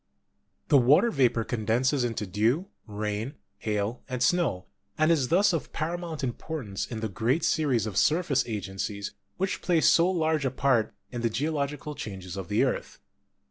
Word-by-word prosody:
The 140 - +7
water 145 - +5
vapor 125 - +2
condenses 120 +4 +1
into 115 -3 -2
dew, 115 - 0 0.2
rain, 105 +5 -3 0.2
hail, 105 +2 -2
and 125 -1 -1
snow, 145 - +1 0.3
and 155 +1 +4
is 145 -6 +2
thus 190 +5 +4
of 165 - -3
paramount 165 -1 -3
importance 125 -5 -4
in 115 -2 -5
the 110 - -1
great 115 - 0
series 135 -9 +2
of 105 -4 -4
surface 160 -3 +3
agencies 100 -1 -4 0.3
which 190 +1 -1
play 175 -3 +2
so 170 +3 +5
large 160 -4 +1
a 135 - +1
part 130 -3 +1 0.2
in 120 -2 -4
the 115 - +1
geological 150 +2 -2
changes 95 -8 -7
of 95 -3 -5
the - - +2
earth. - - -2
130 Hz, 160 wpm, -27 LUFS, 110-155 Hz, 0.3 s, The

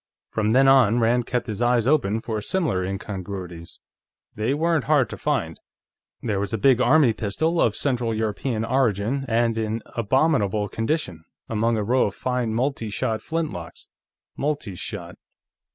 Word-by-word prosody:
From 110 -1 0
then 135 +4 +5
on, 125 -5 +5
Rand 120 +1 +2
kept 125 -1 -1
his 110 -1 -5
eyes 120 -1 +3
open 115 -7 +2
for 110 -2 -3
similar 155 - 0
incongruities. 95 -3 -6 0.5
They 110 +6 -1
weren't 165 -1 +1
hard 145 -4 +3
to - - -4
find. 85 - -2 0.6
There 105 -4 -1
was 100 - -2
a 115 - 0
big 125 +3 +4
army 130 -1 +5
pistol, 160 +12 -1
of 110 - +2
Central 125 -5 0
European 110 +1 -2
origin 125 +1 0
and 115 0 +1
in 110 0 -2
abominable 115 -4 +1
condition, 115 - -2 0.2
among 115 +1 +1
a 105 - 0
row 125 +3 +2
of 100 - -6
fine 125 -3 -1
multi 125 -2 -1
shot 110 +2 -2
flintlocks. 155 - -5 0.5
Multi 145 -8 -2
shot 90 - -7
115 Hz, 150 wpm, -24 LUFS, 105-135 Hz, 0.6 s, then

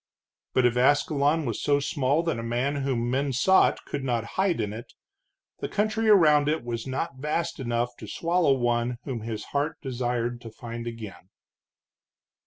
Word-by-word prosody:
But 130 - +4
if 120 0 +2
Ascalon 145 +3 +3
was 115 -4 -3
so 145 -1 +2
small 140 +2 +1
that 165 -8 -1
a - - -3
man 120 +5 -1
whom 130 -4 -1
men 135 +2 0
sought 165 +10 +3
could 140 - -4
not 120 -4 0
hide 190 -5 +1
in 105 -2 -2
it, 115 +2 -9 0.7
the - - -4
country 215 +1 0
around 150 -7 +6
it 155 -4 0
was 120 0 -4
not 130 +1 -3
vast 155 +4 -2
enough 120 -1 -1
to 110 - -9
swallow 165 - +2
one 120 0 0
whom 125 -5 -4
his 110 -1 -5
heart 145 +2 0
desired 120 -2 -2
to 115 - -8
find 115 +1 -7
again. 110 -5 -8
130 Hz, 170 wpm, -26 LUFS, 120-150 Hz, 0.7 s, around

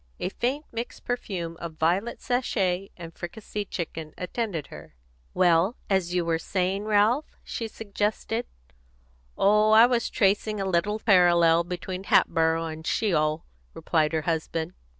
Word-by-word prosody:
A - - -2
faint, 265 +9 -2
mixed 230 +1 -6
perfume 180 -9 -4
of 170 -2 -6
violet 180 +9 0
sachet 195 -7 0
and 165 -2 -9
fricasseed 205 +3 -6
chicken 160 -3 -5
attended 180 -4 -3
her. - - -12 0.4
"Well, 180 +4 +3 0.2
as 190 -3 +1
you 175 -1 +1
were 165 -1 0
saying, 190 +3 -1
Ralph?" 215 +7 +2
she 230 - -4
suggested. 220 +2 -3 0.9
"Oh, 210 +2 +4
I 225 +2 +9
was 245 -1 +1
just - - -6
tracing 205 +1 +2
a 195 - -1
little 190 +3 +1
parallel 175 -5 +4
between 180 +2 -5
Hatboro' 165 -2 +3
and 160 0 -7
Sheol," 155 -7 +1 0.3
replied 155 -2 +1
her 160 -1 0
husband. 165 +1 -2
185 Hz, 140 wpm, -26 LUFS, 165-215 Hz, 0.9 s, I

